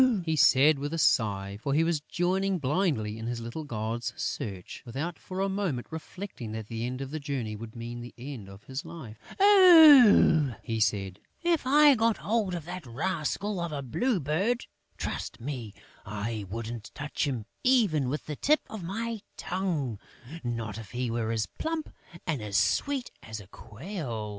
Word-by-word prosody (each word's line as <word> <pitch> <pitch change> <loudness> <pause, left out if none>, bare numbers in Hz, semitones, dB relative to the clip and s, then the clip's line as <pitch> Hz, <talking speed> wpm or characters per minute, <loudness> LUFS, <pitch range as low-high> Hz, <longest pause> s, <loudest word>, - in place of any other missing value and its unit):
he 160 -1 +1
said, 145 0 +5
with 145 +3 -3
a - - -2
sigh, 100 -8 +1
for 140 0 0
he 160 - +4
was 165 -2 0
joining 185 +4 0
blindly 135 - 0
in 115 - -5
his 120 0 -3
little 120 +7 -5
gods' 120 -2 -3
search, 95 -4 -4
without 140 +8 -4
for 185 +1 -5
a 195 - +2
moment 190 -11 -2
reflecting 160 - -7
that 110 -1 -5
the 115 +2 -4
end 130 +2 -4
of 135 0 -5
the 155 - -3
journey 135 -7 -3
would 110 +2 -9
mean 120 +1 -6
the 120 - -8
end 120 -6 -8
of 95 +1 -13
his 135 +1 -5
life. 120 -10 -10 0.2
"Ah," 305 - +8
he 115 -2 -2
said, 100 -3 0 0.2
"if 335 -6 +1
I 295 +1 +7
got 225 -2 +2
hold 210 -4 0
of 165 -3 -6
that 180 0 -6
rascal 180 - -2
of 170 -1 -3
a 140 -2 -4
Blue 215 - 0
Bird, 185 - 0 0.3
trust - - -4
me, 120 -4 -5 0.3
I 105 0 -4
wouldn't 115 +1 -5
touch 145 +1 -2
him 120 -6 -3 0.2
even 205 - +3
with 150 +3 -3
the 150 - -4
tip 300 - +3
of 220 - -6
my 220 +5 -3 0.2
tongue, 165 - -2 0.4
not 115 -3 -3
if 110 -3 -10
he 125 -1 -1
were 115 -1 -1
as 110 -2 0
plump 320 -1 -4 0.4
and 155 -8 -1
sweet 275 - +1
as 110 -1 -7
a 105 - -11
quail!" 115 - -6
140 Hz, 175 wpm, -28 LUFS, 115-190 Hz, 0.4 s, Ah